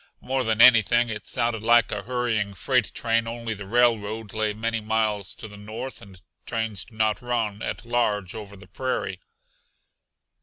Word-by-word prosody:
More 130 0 -1
than 110 -1 +1
anything 120 -1 +6
it 105 -2 -6
sounded 115 -3 0
like 115 +1 +4
a 105 - -2
hurrying 115 -3 -1
freight 125 -2 +1
train 115 -1 +1
only 115 -1 -4
the 100 -2 -9
railroad 110 -2 +1
lay 110 -1 0
many 115 +1 -2
miles 105 -2 0
to - - -8
the 105 -1 -12
north, 110 +6 -7
and 95 -2 -14 0.3
trains 110 -4 -2
do 110 - -18
not 110 -1 +1
run 115 -4 -2
at 110 - -4
large 105 -6 0
over 100 -2 -8
the 100 - -14
prairie. 130 -7 -3
110 Hz, 165 wpm, -25 LUFS, 105-120 Hz, 0.3 s, anything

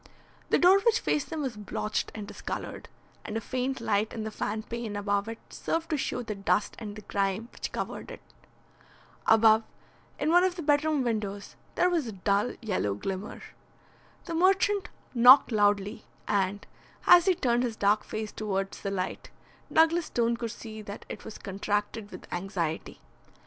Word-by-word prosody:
The - - +4
door 370 +3 +6
which 465 +3 +3
faced 295 - -1
them 315 -3 -3
was 255 -4 -3
blotched 210 0 -3
and 210 -2 -6
discoloured, - - -6 0.3
and 215 - -4
a - - 0
faint 255 +3 -2
light 215 -1 0
in 220 - -4
the 220 - -4
fan 215 +1 -3
pane 230 -2 -5
above 205 0 0
it 225 - -5
served 330 0 -3
to - - +2
show 250 -2 -2
the 220 -2 -4
dust 200 +1 0
and 210 -3 -6
the 215 - -9
grime 200 +3 -1
which - - -6
covered - - -5
it. - - -8 1.1
Above, 220 0 +6 0.6
in 305 +2 0
one 350 +1 +6
of 370 -1 +1
the 340 - -5
bedroom 295 -1 +2
windows, 210 -4 -3 0.2
there 360 - +4
was 335 -7 0
a 220 - -5
dull 200 +4 0
yellow 185 - 0
glimmer. 190 - -5 0.8
The 335 - -5
merchant 385 +3 +3 0.2
knocked 250 +2 +8
loudly, 205 0 +1 0.2
and, 200 0 0 0.4
as 350 -1 +8
he 375 - +5
turned 245 -5 +1
his 240 -3 -1
dark 205 0 +2
face 215 -1 -5
towards 195 -2 -3
the 200 - -2
light, 185 -2 -3 0.4
Douglas 325 +1 +4
Stone 235 0 +1
could 235 -1 -3
see 220 -1 -8
that 205 -1 -8
it - - -7
was 220 - -8
contracted 205 +2 -3
with - - -10
anxiety. 175 -3 -3
220 Hz, 170 wpm, -28 LUFS, 205-270 Hz, 1.1 s, knocked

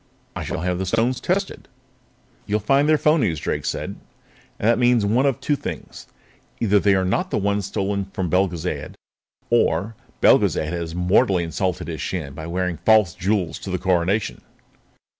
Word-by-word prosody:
I - - -4
shall - - -4
have 90 0 -1
the 95 - -2
stones 115 +5 0
tested." 195 +2 -2 0.8
"You'll 105 +1 +1
find 135 +8 +2
they're 155 - +5
phonies," 145 - +2
Drake 75 - -3
said. - - -3 0.6
"And 105 - -1
that 115 +1 +3
means 120 -3 +3
one 120 +7 +2
of 135 - 0
two 145 - 0
things. - - -7 0.5
Either 105 -3 +3
they 100 0 +3
are 95 0 +1
not 180 - 0
the - - -1
ones 100 -1 0
stolen 100 0 -2
from 95 -1 -4
Belgezad 90 0 -1 0.6
or 115 -2 +1 0.3
else - - +7
Belgezad 80 +2 -1
has 85 -1 -4
mortally 90 0 +2
insulted 85 0 -2
his 80 -2 -5
Shan 75 -7 -4
by 80 +3 -7
wearing 90 0 -2
false 105 0 +4
jewels 95 -2 -1
to - - -7
the 95 - -1
Coronation." 95 +3 0
95 Hz, 170 wpm, -22 LUFS, 90-115 Hz, 0.8 s, else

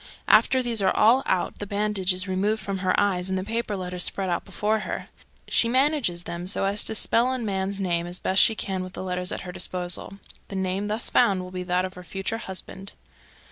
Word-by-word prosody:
After 260 -1 +5
these 235 -3 +1
are 190 - +4
all 235 +7 +5
out 180 - 0
the 205 - -5
bandage 205 -2 0
is 185 +2 0
removed 200 +4 0
from 195 -1 -4
her 185 -1 +2
eyes, 190 -3 +1
and 190 - 0
the 185 - -2
paper 220 0 -2
letters 180 -1 -1
spread 190 -2 0
out - - -1
before 210 +3 0
her. - - -5 0.4
She 230 - +3
manages 260 - +1
them 175 +1 -5
so 195 - 0
as 200 +1 +1
to 220 - -1
spell 235 +4 +3
a 260 - -1
man's 200 -3 -2
name 175 -3 0
as 175 +1 -5
best 190 +1 +3
she 225 - +4
can 190 -3 -3
with 185 0 -8
the - - -6
letters 180 -1 -2
at - - -4
her 180 - -7
disposal. 180 +1 -2 0.3
The 195 - -7
name 190 +2 -1
thus 215 +2 -1
found 190 -2 +3
will 180 - -9
be 185 0 -4
that 180 +1 +1
of 185 - -7
her 180 - -10
future 195 +5 -4
husband. 190 -1 -7
195 Hz, 225 wpm, -25 LUFS, 185-210 Hz, 0.4 s, After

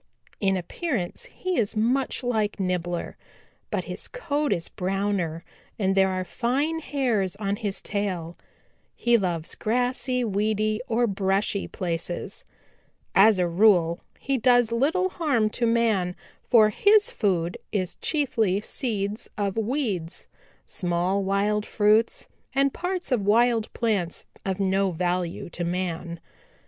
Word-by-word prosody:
In 195 -2 +2
appearance 225 - -3
he 370 -7 -3
is 215 -1 0
much 255 +5 +1
like 220 -4 0
Nibbler, 175 -2 -2 0.5
but - - -1
his - - -4
coat 300 - -2
is 170 -1 0
browner 185 -3 -2 0.3
and 195 -2 +1
there 190 0 +4
are 185 0 -1
fine 270 - -1
hairs 240 - 0
on 200 -1 -2
his 205 -4 -3
tail. 185 -5 -2 0.6
He 240 0 +3
loves 175 -6 -1
grassy, 250 +2 0
weedy 215 0 0
or 235 +1 +2
brushy 195 -1 0
places. 175 -1 -4 0.7
"As 205 +1 +6
a 180 -1 +2
rule 175 -2 +4 0.2
he 270 -1 -1
does 245 -1 +4
little 315 +11 +2
harm 275 -12 +1
to 235 +1 0
man, 220 -6 +2 0.3
for 220 -3 +6
his 415 - +4
food 180 -5 0
is 185 -4 -1
chiefly 225 - +1
seeds 210 -2 -2
of 200 -2 -1
weeds, 220 - -2 0.4
small 180 +2 0
wild 200 +2 +1
fruits 215 +2 +2 0.3
and 275 0 +3
parts 360 -3 -3
of 245 -4 +2
wild 225 +2 +3
plants 205 -7 -1 0.2
of 190 0 -1
no 195 0 +2
value 180 +2 -2
to 175 - -3
man. 170 -1 -3
205 Hz, 130 wpm, -25 LUFS, 185-240 Hz, 0.7 s, As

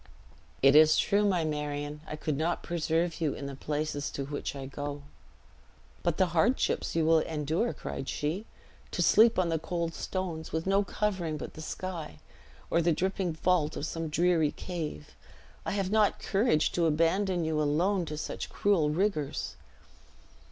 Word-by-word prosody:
"It 135 +1 +7
is 155 0 +7
true, 205 +1 +3
my 180 -5 +1
Marion; 150 -1 -3
I - - -4
could 155 -1 -2
not 160 +4 -1
preserve 170 0 -1
you 155 -3 0
in 140 - -6
the 140 - -5
places 145 0 -2
to 140 - -4
which 145 0 -4
I 135 -1 -6
go." 145 +1 -5 1.0
"But 170 -2 0
the 190 - +4
hardships 220 +5 +1
you 165 -1 +2
will 160 0 +5
endure!" 160 +8 -1
cried 135 - -6
she; 165 +9 -2 0.4
"to - - 0
sleep 225 +1 +6
on 180 -2 +2
the 165 -1 0
cold 170 0 -2
stones, 175 -4 -4
with 160 0 -2
no 195 +1 +3
covering 185 -6 -2
but - - -7
the 155 - -9
sky, 165 - -5 0.5
or 170 - +3
the 170 +1 +3
dripping 190 0 -1
vault 160 -2 +1
of 145 - -3
some 165 0 -3
dreary 165 -1 +2
cave! 155 - -6 0.5
I - - 0
have 195 -1 -1
not 215 -1 +3
courage 195 -6 +2
to 170 -2 +2
abandon 170 +3 +1
you 155 -1 0
alone 170 +6 +1
to 150 -1 -5
such - - -5
cruel 185 -7 +2
rigors." 155 -3 -1
165 Hz, 165 wpm, -29 LUFS, 150-185 Hz, 1.0 s, It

